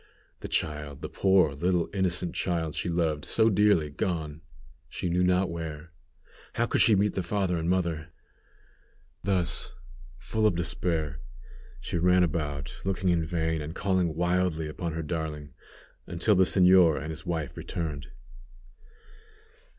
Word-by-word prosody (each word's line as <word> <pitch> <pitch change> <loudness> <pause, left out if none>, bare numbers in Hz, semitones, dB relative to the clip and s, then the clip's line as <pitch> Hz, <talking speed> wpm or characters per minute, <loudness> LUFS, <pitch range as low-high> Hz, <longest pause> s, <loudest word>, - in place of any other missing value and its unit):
The - - -6
child! 75 -2 -2
The - - -4
poor 95 -6 +3
little 85 +3 0
innocent 90 -3 0
child 80 -4 -1
she - - -2
loved 80 -3 0
so 110 0 +3
dearly, 100 -7 +3
gone, 80 -1 -3 0.5
she 90 - -3
knew 90 +1 +2
not 90 +1 +3
where! 80 -1 -6 0.6
How 120 - +1
could - - +1
she 110 - +6
meet 100 +1 +2
the 95 - -1
father 95 0 -1
and 85 0 -2
mother? 85 -3 -1 1.1
Thus, 90 -3 -1 0.4
full 110 - 0
of 90 - +1
despair, 80 -4 -2 0.6
she 85 - -3
ran 90 +1 +4
about, 75 -4 -3
looking 95 -1 0
in 85 -2 +2
vain, 80 -1 -1
and 75 +3 -6
calling 95 -5 0
wildly 90 -2 0
upon 80 +2 -4
her 80 0 -3
darling, 75 -2 -4 0.5
until 85 +5 +2
the 95 -1 +5
señor 90 -4 +5
and 80 +1 -5
his 80 +3 -8
wife 80 -6 -3
returned. 75 -6 -4
85 Hz, 145 wpm, -28 LUFS, 80-90 Hz, 1.1 s, she